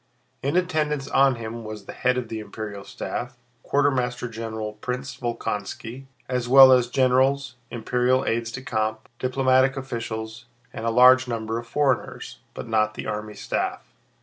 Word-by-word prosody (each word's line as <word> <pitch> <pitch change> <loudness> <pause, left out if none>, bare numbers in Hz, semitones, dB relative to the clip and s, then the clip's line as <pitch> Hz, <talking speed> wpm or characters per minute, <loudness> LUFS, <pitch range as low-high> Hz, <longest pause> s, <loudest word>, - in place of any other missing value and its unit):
In 140 +6 0
attendance 150 -5 0
on 135 -2 +4
him 115 0 -6
was 110 -2 -8
the - - -8
head 125 0 +1
of 125 -2 -3
the 110 0 -5
imperial 105 -2 -7
staff, 120 +4 -5 0.2
Quartermaster 125 -3 0
General 110 -2 -5
Prince 125 +4 -5
Volkónski, 120 +1 -4 0.2
as 125 -1 -2
well 135 0 +9
as 125 -2 +5
generals, 130 +1 +2 0.2
imperial 125 +2 +1
aides 115 0 -1
de 130 +1 -7
camp, 110 -2 -2
diplomatic 130 +1 +2
officials, 115 -2 -5 0.3
and 115 - -4
a - - +3
large 125 +2 +6
number 115 -1 -2
of 120 - -10
foreigners, 135 -1 -1 0.2
but - - -6
not 110 -1 +1
the - - -6
army 105 0 -4
staff. - - -3
125 Hz, 150 wpm, -24 LUFS, 110-130 Hz, 0.3 s, well